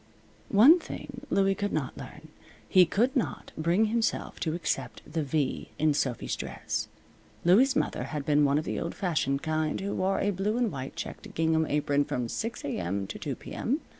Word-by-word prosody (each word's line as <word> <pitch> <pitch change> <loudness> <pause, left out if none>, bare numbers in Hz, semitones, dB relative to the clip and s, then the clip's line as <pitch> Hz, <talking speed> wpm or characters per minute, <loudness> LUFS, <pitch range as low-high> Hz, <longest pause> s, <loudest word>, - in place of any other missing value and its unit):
One 260 - +8
thing 270 -4 -8
Louie 195 0 +3
could 205 +1 -2
not 140 -5 -2
learn. - - -10 0.4
He 185 -2 +6
could 240 +9 +1
not 255 - -2
bring 170 +7 +2
himself 225 +1 -1
to 160 -1 -1
accept 175 - -3
the 160 +1 -2
V 145 -1 -1
in 155 -1 +3
Sophy's 130 -4 -1
dress. - - -4 0.6
Louie's 250 +10 +5
mother - - 0
had 150 -3 -4
been 150 -1 +4
one 140 0 +3
of 155 - -1
the - - -2
old - - -4
fashioned 150 -7 0
kind 155 -1 0
who 200 +1 -3
wore 190 +1 +1
a 205 - +1
blue 200 +4 -1
and 245 -3 +1
white 135 -2 -6
checked - - -7
gingham 160 -1 +2
apron 145 -1 +1
from 125 -4 -3
6 230 - -4
A.M. 95 -6 -2
to - - -7
2 140 -3 -3
P.M. 275 - -3
165 Hz, 185 wpm, -28 LUFS, 145-210 Hz, 0.6 s, One